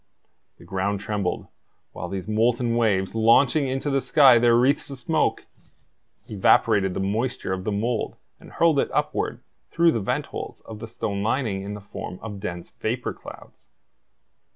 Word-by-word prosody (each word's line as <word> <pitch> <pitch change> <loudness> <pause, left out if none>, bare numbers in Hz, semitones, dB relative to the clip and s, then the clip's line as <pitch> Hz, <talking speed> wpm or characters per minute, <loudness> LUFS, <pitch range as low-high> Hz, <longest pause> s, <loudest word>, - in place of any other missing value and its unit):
The - - -16
ground 95 +2 -2
trembled, 100 -3 -2 0.5
while 90 - -6
these 95 0 -5
molten 115 +2 +1
waves, 100 -5 +1
launching 125 +6 +4
into 135 +2 -2
the 135 0 +1
sky 135 -6 +6
their 120 0 +4
wreaths 130 +5 +2
of 135 -2 -8
smoke, 155 +5 0 0.8
evaporated 95 -1 +3
the - - -2
moisture 105 +1 -1
of 95 0 -5
the 105 - -1
mould 110 +3 -1 0.2
and - - -15
hurled 165 -4 +3
it - - +1
upward - - -1 0.3
through 170 0 +3
the 115 - -1
vent 100 - -1
holes - - -6
of 110 -1 -10
the 115 - -7
stone 100 -2 -3
lining 110 -3 -1
in 100 +1 -6
the - - -7
form 100 -2 -7
of 105 -3 -6
dense 90 -4 -6
vapor - - -3
clouds. - - -14
110 Hz, 165 wpm, -24 LUFS, 100-125 Hz, 0.8 s, sky